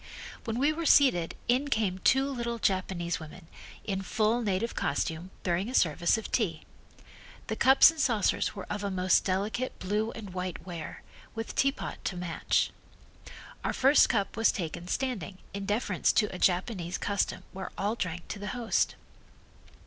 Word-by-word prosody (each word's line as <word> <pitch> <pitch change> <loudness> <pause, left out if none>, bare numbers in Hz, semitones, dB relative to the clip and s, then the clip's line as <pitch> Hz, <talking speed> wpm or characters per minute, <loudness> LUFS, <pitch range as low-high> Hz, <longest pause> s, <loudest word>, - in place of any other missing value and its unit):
When 225 -1 -2
we 285 +4 +3
were 330 0 -2
seated 175 - +4
in 255 +4 +2
came 210 -8 0
two 265 +8 +3
little 235 -3 -3
Japanese 185 -4 -1
women, 165 +2 -11 0.4
in 195 -2 -2
full 220 +5 +1
native 210 +1 -1
costume, 160 +5 -2
bearing 180 +4 0
a 255 - -4
service 170 +4 +3
of 225 - -6
tea. 170 -10 0 0.8
The - - -3
cups 265 +4 +7
and 325 - -11
saucers 230 -6 +1
were 195 - -6
of 210 0 -4
a 200 - -1
most 185 -1 +3
delicate 205 +7 -1
blue 210 +4 -1
and 210 -4 -8
white 180 -2 -4
ware, 170 -4 -7 0.3
with 225 0 -4
teapot 275 +1 -1
to 180 - -2
match. 175 -2 0 0.9
Our - - -1
first 270 +3 +5
cup 200 -5 0
was 225 0 +4
taken 170 -1 -5
standing 210 -6 -2 0.2
in 200 0 -5
deference 210 +4 +1
to 210 -4 +2
a 180 - -6
Japanese 180 -1 0
custom 200 -1 -1
where 190 0 -6
all 205 +2 0
drank 175 -6 -4
to 205 - -5
the 205 - -5
host. 235 -2 +1
200 Hz, 165 wpm, -29 LUFS, 180-235 Hz, 0.9 s, cups